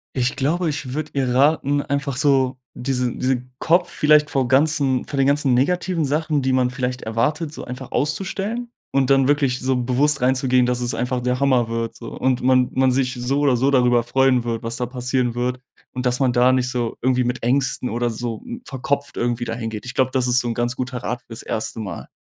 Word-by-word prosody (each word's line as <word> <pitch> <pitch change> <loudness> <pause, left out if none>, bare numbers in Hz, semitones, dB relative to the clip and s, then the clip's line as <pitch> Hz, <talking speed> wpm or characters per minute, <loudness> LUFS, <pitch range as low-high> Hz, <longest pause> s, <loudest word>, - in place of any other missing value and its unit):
Ich 125 0 0
glaube, 160 +5 0
ich 140 -3 -5
würde 155 -1 -4
ihr 135 -2 0
raten, 145 +1 +2
einfach 140 -1 -2
so 135 -2 +2 0.2
diese 125 -1 -1
diesen 125 -1 -2
Kopf 175 +2 +2
vielleicht 150 0 +4
vor 135 -2 +1
ganzen 135 -1 +2
vor 140 - -5
den 135 0 +3
ganzen 140 -2 +2
negativen 175 +6 +1
Sachen, 150 +1 0
die 130 0 0
man 130 -1 +2
vielleicht 125 -1 -3
erwartet, 150 +8 -1
so - - -7
einfach 125 +1 -8
auszustellen. 195 - -2 0.2
Und 135 -1 +2
dann 135 -1 +4
wirklich 140 -3 +1
so 130 0 0
bewusst 130 +4 +2
reinzugehen, 130 0 +3
dass 125 0 -1
es 120 0 -1
einfach 125 0 -1
der 125 +1 -1
Hammer 130 -4 +2
wird, 115 0 -3
so, 115 - -9
und 130 -1 -1
man 130 0 +3
man 130 0 +3
sich 125 -1 0
so 125 +3 -1
oder 140 -3 +3
so 130 +3 +2
darüber 125 -3 +4
freuen 125 +1 +2
wird, 115 -1 -3
was 115 0 -3
da 125 - -2
passieren 125 -1 -1
wird 125 +1 -1 0.3
und 125 0 -2
dass 125 0 +1
man 130 -3 +2
da 125 +1 +4
nicht 130 -1 +1
so 120 -2 -2
irgendwie 125 0 +2
mit 125 0 -3
Ängsten 125 +1 +1
oder 120 +2 -1
so 115 0 -5 0.2
verkopft 140 +2 -3
irgendwie 120 0 -1
da 115 - -3
hin 115 -1 -4
geht. 110 +2 -7
Ich 125 - -6
glaube, 130 -1 +2
das 130 -1 +1
ist 125 0 +3
so 120 - -2
'n 115 - -2
ganz 120 0 -1
guter 125 -1 -4
Rat 120 +2 -3
für - - -40
das 115 0 -8
1. 110 +1 -3
Mal. 100 -6 -6
130 Hz, 220 wpm, -21 LUFS, 125-140 Hz, 0.3 s, vielleicht